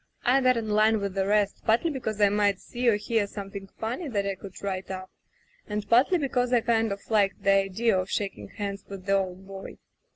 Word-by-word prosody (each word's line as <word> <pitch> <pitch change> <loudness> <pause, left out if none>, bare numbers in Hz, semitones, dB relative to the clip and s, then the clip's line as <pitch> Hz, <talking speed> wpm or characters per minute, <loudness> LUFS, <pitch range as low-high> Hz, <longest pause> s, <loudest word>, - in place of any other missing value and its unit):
I 265 +2 +4
got 255 -1 +4
in 225 -1 -2
line 215 +1 +3
with 200 -1 -3
the 195 0 0
rest, 205 -1 +1
partly 235 +9 +2
because 220 -6 -4
I 205 -1 +5
might 205 -1 +2
see 245 0 0
or 220 - +4
hear 210 0 0
something 195 -1 -7
funny 245 +9 -3
that 205 -6 -1
I 200 - 0
could 190 0 -10
write 190 -1 -3
up, 185 0 -6 0.6
and 210 -1 -3
partly 255 +10 +4
because 250 -5 0
I 245 -2 +4
kind 225 -1 +1
of 200 0 -6
liked 200 -3 +2
the 195 - +4
idea 195 +2 +2
of 185 +1 -3
shaking 200 -2 -3
hands 200 -2 -5
with 195 -2 -8
the 195 - +1
old 190 -1 -1
boy. 195 0 -9
205 Hz, 220 wpm, -27 LUFS, 195-230 Hz, 0.6 s, I